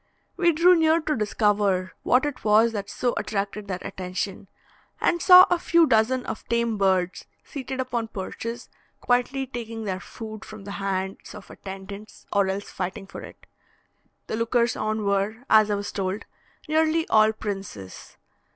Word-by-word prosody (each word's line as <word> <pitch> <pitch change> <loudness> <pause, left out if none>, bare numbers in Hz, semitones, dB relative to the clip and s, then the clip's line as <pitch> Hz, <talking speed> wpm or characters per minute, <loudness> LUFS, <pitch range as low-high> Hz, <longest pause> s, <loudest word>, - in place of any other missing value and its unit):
We 345 -2 +3
drew 345 +3 +5
near 320 0 +4
to 310 -2 -1
discover 205 -3 +1
what 255 +3 +3
it 285 -3 -4
was 220 +2 +4
that 205 -2 -5
so 245 +4 -1
attracted 205 0 -3
their 185 -2 -3
attention, 185 +2 -5 0.5
and 345 - +1
saw 365 0 +10
a 355 - +3
few 340 -1 +4
dozen 250 +1 +2
of - - -5
tame 235 -2 0
birds 185 -2 +1 0.2
seated 265 -2 -6
upon 240 -3 -2
perches 225 +4 -6 0.3
quietly 250 +2 +1
taking 230 -3 -6
their 190 -3 -3
food 220 +1 -9
from 215 -2 -11
the 200 - -7
hands 190 -1 -3
of 210 - -11
attendants, 195 +2 -10
or 200 -1 +3
else 195 +1 -4
fighting 185 +1 -4
for 195 - -9
it. - - -13 0.8
The 220 - -3
lookers 235 +1 +1
on 215 0 -2
were, 200 +4 0
as 215 -1 +6
I 205 - +1
was 205 0 -4
told, 195 +1 -3 0.4
nearly 315 +1 +2
all 215 0 +5
princes. 195 - -7
215 Hz, 160 wpm, -25 LUFS, 195-250 Hz, 0.8 s, saw